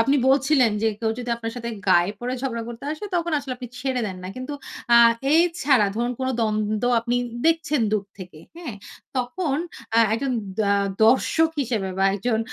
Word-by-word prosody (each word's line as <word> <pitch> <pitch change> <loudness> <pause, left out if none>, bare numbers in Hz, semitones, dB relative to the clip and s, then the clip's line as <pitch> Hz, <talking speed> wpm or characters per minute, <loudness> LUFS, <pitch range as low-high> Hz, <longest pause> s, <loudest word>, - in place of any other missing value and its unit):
আপনি 275 +5 +3
বলছিলেন, 270 -2 +4
যে 225 - +3
কেউ 225 0 0
যদি 245 -1 -4
আপনার 225 -1 -5
সাথে 235 -1 -5 0.2
গায়ে 175 +3 +4
পড়ে 245 +2 -3
ঝগড়া 235 -4 -2
করতে 235 +2 -8
আসে 310 +6 -7
তখন 340 -1 -1
আসলে 275 -2 -5
আপনি 250 -1 -8
ছেড়ে 260 -1 -1
দেন 190 -2 -5
না। 185 - -6
কিন্তু 255 +3 -5 0.4
আ - - +9 0.4
এই 320 - +6 0.2
ছাড়া 265 -7 +4
ধরুন 240 +1 0
কোন 260 - 0
দ্বন্দ্ব 215 0 0 0.2
আপনি 240 +1 -1 0.3
দেখছেন 325 -3 +2
দূর 210 -2 +1
থেকে। 180 -4 -10 0.2
হ্যাঁ? 325 -10 -6 0.4
তখন 275 +4 -1 0.4
আ - - +6 0.2
একজন 260 +3 -1 0.3
দা 200 -1 +2 0.3
দর্শক 290 +7 +3
হিসেবে 220 -6 -2
বা 195 - +3
একজন 220 +3 0
245 Hz, 180 wpm, -23 LUFS, 220-275 Hz, 0.4 s, আ